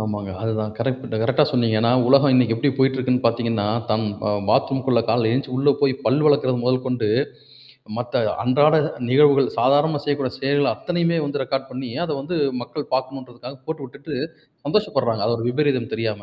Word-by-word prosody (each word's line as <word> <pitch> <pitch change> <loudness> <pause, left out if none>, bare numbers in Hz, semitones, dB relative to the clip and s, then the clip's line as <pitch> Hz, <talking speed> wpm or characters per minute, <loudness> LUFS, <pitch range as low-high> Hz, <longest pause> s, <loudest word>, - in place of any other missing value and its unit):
ஆமாங்க. 105 -2 -4
அதுதான் 110 -1 -2
கரெக்ட் 130 -2 -3
கரெக்ட்டா 150 +6 +3
சொன்னீங்க. 120 -5 +1
ஏன்னா, 115 +1 +2 0.2
உலகம் 140 +1 +5
இன்னைக்கி 125 -3 +3
எப்டி 115 +5 0
போய்கிட்டு 135 0 +2
இருக்குன்னு 125 0 0
பார்த்தீங்கன்னா, 115 -2 0 0.2
தன் 110 +1 0 0.2
அ - - +1 0.2
பாத்ரூம்குள்ள 130 -2 +2
காலைல 110 0 +2
எந்திருச்சு 130 +2 -2
உள்ளே 140 +2 +3
போய் 135 -2 +2
பல் 135 +3 +2
வெளக்றது 140 -4 +3
மொதல் 125 +1 0
கொண்டு, 125 -4 -1 0.9
மத்த 120 -1 -1 0.2
அன்றாட 145 +5 +4 0.2
அ - - -9
நிகழ்வுகள், 140 0 +5
சாதாரணமா 145 +3 +2
செய்யக்கூடிய 140 -3 -2
செயல்கள் 140 +1 +1
அத்தனையுமே 170 -1 -1
வந்து 140 -1 -2
ரெக்கார்ட் 135 +1 -3
பண்ணி, 130 -1 -6
அத 170 - -5
வந்து 160 +5 -3 0.2
மக்கள் 145 +4 -7
பார்க்கணுன்றதுக்காக 130 0 -6
போட்டு 160 -3 -5
விட்டுட்டு, 140 +4 -8 0.5
சந்தோஷப்பட்றாங்க. 135 - 0
அது 115 - +1
ஒரு 115 - -3
விபரீதம் 130 -3 0
தெரியாம. 110 -2 -3
130 Hz, 165 wpm, -21 LUFS, 120-140 Hz, 0.9 s, உலகம்